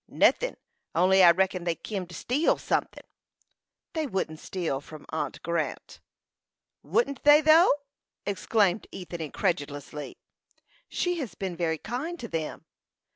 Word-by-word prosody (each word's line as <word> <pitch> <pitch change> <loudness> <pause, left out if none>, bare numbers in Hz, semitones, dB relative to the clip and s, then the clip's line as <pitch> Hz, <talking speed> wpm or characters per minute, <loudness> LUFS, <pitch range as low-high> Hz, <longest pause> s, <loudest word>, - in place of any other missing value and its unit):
"Nothin'; - - +2 0.4
only 190 +3 +5
I 175 - +10
reckon 185 +1 +2
they 170 -1 0
kim 195 -2 -5
to 175 - -10
steal 270 - +1
sunthin'." - - -2 0.9
"They 315 -2 -1
wouldn't 165 - -3
steal 165 -8 -3
from 155 +1 -12
aunt 160 - -3
Grant." 170 -1 -3 0.8
"Wouldn't 280 - 0
they, 295 +1 +8
though!" 315 +3 +6 0.5
exclaimed 200 0 +1
Ethan, 175 -2 -7
incredulously. 150 -3 -3 0.7
"She 355 -1 -1
has 260 -8 -5
been 190 -3 -4
very 165 -2 0
kind 275 - -4
to 235 - -5
them." 160 -6 -4
185 Hz, 130 wpm, -27 LUFS, 165-260 Hz, 0.9 s, I